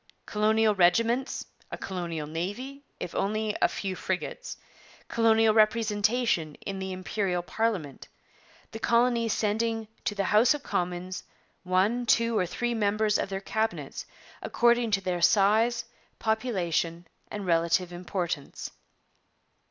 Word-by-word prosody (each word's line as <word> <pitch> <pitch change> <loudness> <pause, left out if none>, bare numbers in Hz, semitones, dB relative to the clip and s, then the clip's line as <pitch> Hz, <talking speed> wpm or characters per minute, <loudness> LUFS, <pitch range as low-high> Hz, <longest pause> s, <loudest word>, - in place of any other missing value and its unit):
Colonial 215 +1 +2
regiments; 230 +8 +2 0.2
a - - -5
colonial 170 -5 -4
navy, 205 - -5 0.2
if 175 - -5
only 215 +2 0
of - - -19
a - - +6
few 190 -2 -4
frigates; 190 - -4 0.5
colonial 225 -1 +4
representation 215 - +2
in 195 -1 -4
the 190 0 -4
Imperial 185 -1 -2
parliament, 185 - -2 0.6
the 225 - -7
colonies 235 0 +2
sending 225 +1 0 0.2
'to 205 - -2
the 200 - 0
House 220 +8 +4
of 290 - -8
Commons 180 +1 -3 0.4
one, 200 +7 +1
two, 230 0 +3
or 180 -4 +1
three 240 +6 -2
members 215 -1 +1
of - - -2
their 195 0 -3
cabinets, 220 +2 -3 0.3
according 235 0 +2
to 200 -2 +1
their 180 -2 -2
size, 220 +5 +4 0.3
population, 180 -7 -1 0.2
and 205 -2 -5
relative 170 +1 +1
importance.' 175 -4 -4
210 Hz, 125 wpm, -28 LUFS, 180-230 Hz, 0.6 s, a